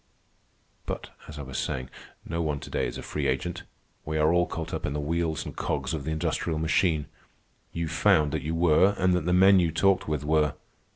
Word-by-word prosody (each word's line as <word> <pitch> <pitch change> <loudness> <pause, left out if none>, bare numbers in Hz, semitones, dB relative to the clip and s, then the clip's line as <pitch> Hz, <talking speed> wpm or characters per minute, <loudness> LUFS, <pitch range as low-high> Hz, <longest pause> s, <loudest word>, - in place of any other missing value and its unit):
But - - -5 0.2
as 75 - -9
I 70 - -5
was 65 -1 -5
saying, 65 -1 -3 0.3
no 85 +1 -2
one 75 -3 -1
to - - -9
day - - 0
is - - -6
a - - -7
free - - -2
agent. 90 0 -2 0.4
We 80 0 -3
are 75 +2 +3
all 90 0 +3
caught 80 -1 -5
up - - -3
in 70 - -2
the 75 - -2
wheels 80 +1 -1
and - - -7
cogs - - -2
of 75 -4 -4
the 80 - -2
industrial 80 +1 -1
machine. 80 -1 +1 0.7
You 85 -1 -3
found 75 -2 +3
that - - -2
you 80 +2 -3
were, 85 +4 +4
and 95 -1 +3
that 90 -3 0
the 90 - +1
men 95 +1 +6
you 85 -2 +2
talked 95 +4 +2
with 75 -2 -2
were. 75 -1 +2
80 Hz, 220 wpm, -27 LUFS, 75-85 Hz, 0.7 s, men